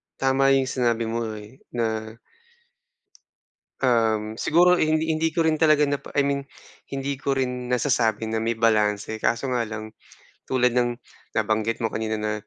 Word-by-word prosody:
tama 135 0 +1
yung 135 - +3
sinabi 120 -3 0
mo, 115 0 -2
eh, 105 +5 -12 0.2
na 110 -1 -2 1.7
um, 110 -4 +1
siguro 175 +7 +4
hindi 155 -1 +1
hindi 160 +1 0
ko 165 - +2
rin 160 -1 +2
talaga 155 -1 +4
napa 145 0 -3
I - - +6
mean, 140 0 -1 0.5
hindi 135 0 -2
ko 140 +1 -2
rin 125 -1 -2
nasasabi 115 -4 +1
na 110 - -1
may 115 +1 0
balanse 110 -1 +1
kaso 120 +3 0
nga 120 -1 +1
lang 110 0 -7 0.6
tulad 125 -1 +2
ng 120 -1 +1 0.4
nabanggit 110 +1 0
mo - - +2
kanina 110 0 -2
na 105 0 -1
120 Hz, 155 wpm, -24 LUFS, 110-135 Hz, 1.7 s, I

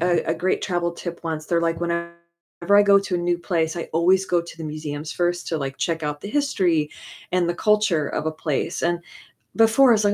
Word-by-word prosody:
a 175 0 +2
a - - +1
great 185 +1 -1
travel 175 -2 -1
tip 170 0 -7
once, 155 -2 -3
they're 170 -1 +1
like, 165 0 -1
"Whenever 170 0 -2 0.6
I 205 - +8
go 200 -1 +6
to 195 -2 -4
a - - -1
new 175 0 0
place, 170 -2 -1
I 170 - -3
always 185 +4 +3
go 175 -1 +2
to 170 - -11
the 160 - -6
museums 150 0 -5
1st 175 0 -1
to, 165 - -1
like, 135 -2 -5
check 165 -2 -1
out 150 0 -3
the 200 - -7
history 180 - +1 0.4
and 180 -1 +2
the 175 - 0
culture 210 -6 +2
of - - -3
a 160 - 0
place." 155 +1 -2
And, 170 0 +1 0.6
before 225 +4 +5
I - - +8
was 215 -1 +2
like, 205 - +3
170 Hz, 230 wpm, -23 LUFS, 160-185 Hz, 0.6 s, I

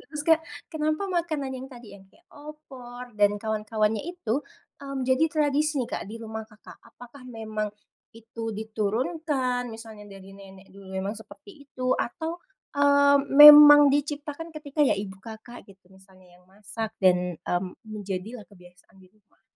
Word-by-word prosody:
Terus, 300 0 -7
Kak, 325 0 +4 0.3
kenapa 310 +3 -1
makanan 330 -7 -3
yang 260 +1 -8
tadi 240 -4 -13
yang 195 -1 -16
kayak 340 - -28
opor 255 -5 -12
dan 205 -1 +2
kawan-kawannya 215 0 -2
itu, 295 -8 -3 0.4
mmm, 275 -2 -5
jadi 260 +4 +2
tradisi 300 0 0
nih, - - -13
Kak, - - -3
di 220 - -8
rumah 220 -1 -8
Kakak? 215 -1 -16
Apakah 250 +1 -15
memang 215 -2 -5 0.5
itu 230 0 -11
diturunkan? 245 +4 -2
Misalnya 220 -2 -11
dari 195 -1 -13
nenek 195 -1 -15
dulu 195 -1 -14
memang 195 +2 -3
seperti 285 - -14
itu? 255 -1 -2
Atau, 325 +8 -4 0.3
eee, 285 0 +4
memang 295 0 +10
diciptakan 290 +2 -3
ketika 305 -2 -7
ya 285 -8 +3
ibu 195 -1 -7
Kakak 225 +2 -12
gitu, 190 -1 -19
misalnya 185 -2 -21
yang - - -28
masak 210 +3 -7 0.2
dan, 180 -1 +2
mmm, 180 +2 -4
menjadilah 205 0 -7
kebiasaan 180 +1 -20
di 185 -1 -21
rumah? 210 -2 -35
230 Hz, 150 wpm, -25 LUFS, 205-285 Hz, 0.5 s, memang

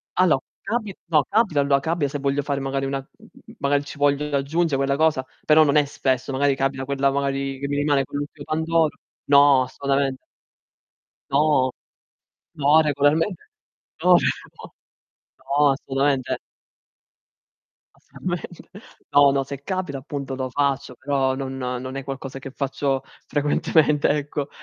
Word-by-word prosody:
allo, 165 -7 +3 0.2
capi 215 -5 -3
no, 155 -4 +3
capita 205 -10 +2
allo 140 0 +3
capita 160 0 -1
se 145 0 -4
voglio 140 +1 0
fare 140 -1 -2
magari 135 0 -2
una 135 0 -2 0.2
mhmm, - - -18
magari 140 0 +1
ci 145 - -10
voglio 145 +1 +2
io 145 -1 0
aggiunge 155 +2 0
quella 140 0 +1
cosa, 155 -4 +2 0.2
però 155 0 +6
non 145 0 +2
è 145 -1 +5
spesso, 130 -1 -1
magari 140 +1 +2
capita 135 -1 -1
quella 140 0 +1
magari 135 -1 -2
che 140 - -3
mi 145 - -2
rimane 145 -2 +2
quell' 145 - -5
ultimo 145 0 -8
pandoro. 160 0 +1 0.3
No, 140 -2 +6
assolutamente. 135 0 -1 1.1
No! 140 -3 +3 0.9
No, 145 +2 +5
regolarmente, 150 +6 +1 0.6
no, 180 0 +6
cioè - - +4 0.3
no. - - -11 0.7
No, 140 +2 +2
assolutamente. 135 -1 -1 1.6
Assolutamente 175 -1 -7 0.4
No, 145 -1 +6
no, 135 0 +1
se 140 +1 -8
capita 180 -6 -3
appunto 140 -1 -5
lo 130 -1 -4
faccio, 140 -1 -1
però 135 -1 0
non 135 0 -5
non 130 +1 -4
è 135 - -5
qualcosa 135 -1 -6
che 135 0 -8
faccio 135 0 -2 0.2
frequentemente, 150 0 +2
ecco. 145 -1 -2
140 Hz, 145 wpm, -23 LUFS, 135-150 Hz, 1.6 s, però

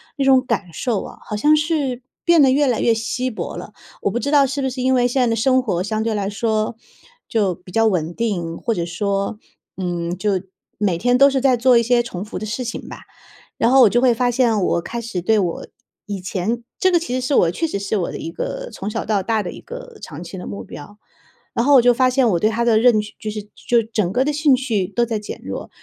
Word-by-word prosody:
那 280 - -1
种 265 -1 +4
感 210 -7 -2
受 225 +3 -1
啊， - - -10
好 210 - -4
像 300 +8 +4
是 295 -5 -1 0.2
变 340 -1 +5
得 265 - +5
越 285 +2 +3
来 245 -3 +1
越 230 - +4
稀 245 +3 -2
薄 220 - -5
了。 - - -9 0.3
我 - - +1
不 240 - -1
知 280 - -2
道 285 -1 +5
是 275 +1 -3
不 265 - 0
是 255 0 -4
因 260 +1 +3
为 245 -1 +3
现 245 +2 -1
在 250 - +4
的 230 -1 +1
生 255 +3 +2
活 185 -7 -1
相 215 +2 -2
对 225 0 -1
来 200 -1 -1
说。 215 +1 -1 0.6
就 205 -6 +1
比 180 +1 -15
较 225 +4 +2
稳 175 -5 0
定， 175 -7 -2
或 230 - -1
者 170 -5 -2
说， 200 +4 -2 0.4
嗯， 175 -1 -3
就 210 +3 0 0.5
每 195 -5 0
天 245 +6 +2
都 275 +2 +7
是 270 -1 0
在 260 -1 +3
做 245 +1 +4
一 - - +5
些 240 +1 +2
重 190 -4 -6
复 210 - -7
的 215 - -5
事 215 +4 -4
情 230 - -6
吧。 - - -10 0.5
然 235 - +2
后 270 - +6
我 225 - +7
就 240 +4 +2
会 250 -2 +5
发 245 +2 +1
现 235 -4 +2
我 170 -1 +1
开 235 +7 -5
始 230 -6 -4
对 215 +5 +2
我 175 -4 -2 0.4
以 200 -2 -4
前 190 +5 -2 0.2
这 375 - +3
个 345 - +4
其 330 -7 -5
实 255 -1 -2
是 280 - -1
我 170 - +4
确 255 - -2
实 250 -11 -3
是 200 +2 -2
我 185 -5 -1
的 - - -6
一 165 - -6
个 - - -4
从 200 - -5
小 - - -3
到 205 -3 0
大 220 +2 0
的 175 -4 -6
一 - - -11
个 485 -1 -10
长 155 +1 -8
期 175 +2 -8
的 180 - -7
目 100 -1 -7
标， 205 - -11 0.6
然 235 - 0
后 290 - +5
我 260 - +8
就 245 +1 +5
发 255 +1 +3
现 255 -1 +2
我 175 - +2
对 215 +5 +2
它 230 +2 -1
的 230 -2 +4
认 230 -1 +5
知 210 0 -6
就 215 - -5
是 210 0 -5
就 235 -1 +1
整 215 -5 -2
个 255 +6 +1
的 300 - 0
兴 295 -1 +3
趣 230 -7 -1
都 220 +5 0
在 225 -2 -2
减 210 - -7
弱。 - - -6
230 Hz, 280 characters per minute, -20 LUFS, 200-255 Hz, 0.6 s, 我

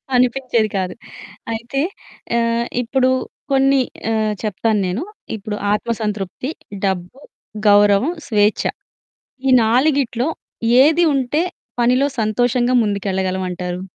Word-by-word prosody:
అనిపించేది 245 -3 +2
కాదు. 180 -1 -2 0.6
అయితే 240 +5 -3 0.6
ఆహ్, 230 0 +1 0.2
ఇప్పుడు 255 +2 +1 0.4
కొన్ని 270 0 +4 0.3
ఆహ్, 215 -1 +1
చెప్తాను 215 0 0
నేను. 195 - -2 0.3
ఇప్పుడు 210 0 -5 0.2
ఆత్మ 225 +3 -1
సంతృప్తి, 210 +4 -3 0.4
డబ్బు, 190 +6 -3 0.5
గౌరవం, 205 +7 +5 0.2
స్వేచ్ఛ 210 -2 +2 0.8
ఈ - - +4
నాలుగిట్లో 255 +2 +2 0.5
ఏది 320 +4 +4
ఉంటే, 275 +4 +1 0.4
పనిలో 250 +3 +3
సంతోషంగా 245 +3 +1
ముందుకెళ్ళగలం 190 -2 -1
అంటారు? 180 +1 -4
230 Hz, 100 wpm, -19 LUFS, 205-255 Hz, 0.8 s, గౌరవం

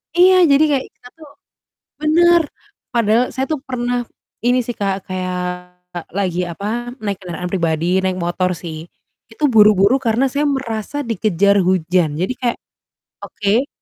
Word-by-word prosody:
Iya, 370 +2 +6 0.2
jadi 280 +2 +5
kayak 270 -2 0
kita - - -16
tuh 310 -2 -14 0.7
benar, 340 +3 +4 0.5
padahal 230 0 +3
saya 265 0 -1
tuh 310 - +1
pernah 245 -1 -2 0.4
ini 250 +1 +3
sih 240 - -4
Kak, 195 -1 0
kayak 185 -1 -3 0.7
lagi 185 -2 -1
apa, 200 +4 -7 0.4
naik 200 -3 -2
kendaraan 180 0 -5
pribadi 165 -3 -1 0.2
naik 185 -1 -1
motor 180 +1 0
sih, 165 -2 -7 0.6
itu 300 - -9
buru-buru 210 +1 +6
karena 230 +4 +2
saya 285 +3 -1
merasa 265 -3 -3
dikejar 200 -3 +2
hujan, 180 -2 +2
jadi 190 +7 -1
kayak, 240 -2 0 0.7
"Oke, 215 +7 0
215 Hz, 140 wpm, -18 LUFS, 185-255 Hz, 0.7 s, Iya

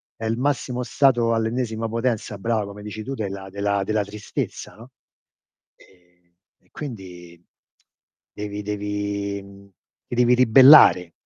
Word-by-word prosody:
è 115 - -7
il 115 +1 -1
massimo 125 -2 -2
stato 120 -3 +2
all'ennesima 115 0 -2
potenza 115 -2 -2
brava 110 0 -1
come 100 +1 -10
dici 105 +1 -7
tu 135 - -5
della 100 -3 -6
della 100 0 -1
della 110 +1 -1
tristezza, 105 +1 -6
no, 115 +4 -14 0.9
ehm, 90 -1 -27 0.3
e - - -32
quindi 90 - -10 0.9
devi 105 0 -6
devi 100 -1 -4
mhmm, 100 0 -16 0.4
ti 120 - -5
devi 125 0 +4
ribellare. 125 - +7
105 Hz, 130 wpm, -22 LUFS, 100-115 Hz, 0.9 s, ribellare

